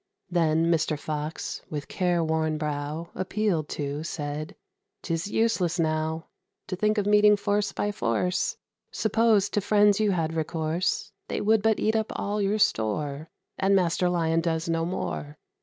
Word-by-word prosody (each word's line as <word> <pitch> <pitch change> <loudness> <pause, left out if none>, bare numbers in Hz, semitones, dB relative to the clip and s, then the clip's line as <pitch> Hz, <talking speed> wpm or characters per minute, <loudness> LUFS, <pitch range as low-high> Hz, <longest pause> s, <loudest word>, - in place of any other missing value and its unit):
Then 165 -1 +2
Mr. 160 -2 +1
Fox, 150 +1 -4
with 150 -1 -5
careworn 160 -3 0
brow, 150 +2 -4
Appealed 185 -5 -1
to, 145 +1 -3
said, 150 -1 -4 0.5
"'Tis 165 +1 -2
useless, 195 -6 +1
now, 160 0 0 0.4
To 185 - -1
think 215 +3 +1
of 205 - +1
meeting 210 0 +5
force 205 0 0
by 205 - -1
force: 120 - 0 0.3
Suppose 220 -2 +3
to 205 - 0
friends 205 0 +4
you 215 -1 +3
had 165 -4 0
recourse, 160 +2 -1 0.2
They - - -2
would 215 +1 +3
but 220 0 +2
eat 220 +1 +1
up 220 -1 0
all 205 +1 -1
your 200 +2 +1
store, 145 - 0 0.3
And 195 +1 +3
Master 180 -1 +2
Lion 165 -2 +1
does 165 -1 -1
no 165 0 0
more. 150 -4 -4
170 Hz, 150 wpm, -26 LUFS, 155-205 Hz, 0.5 s, meeting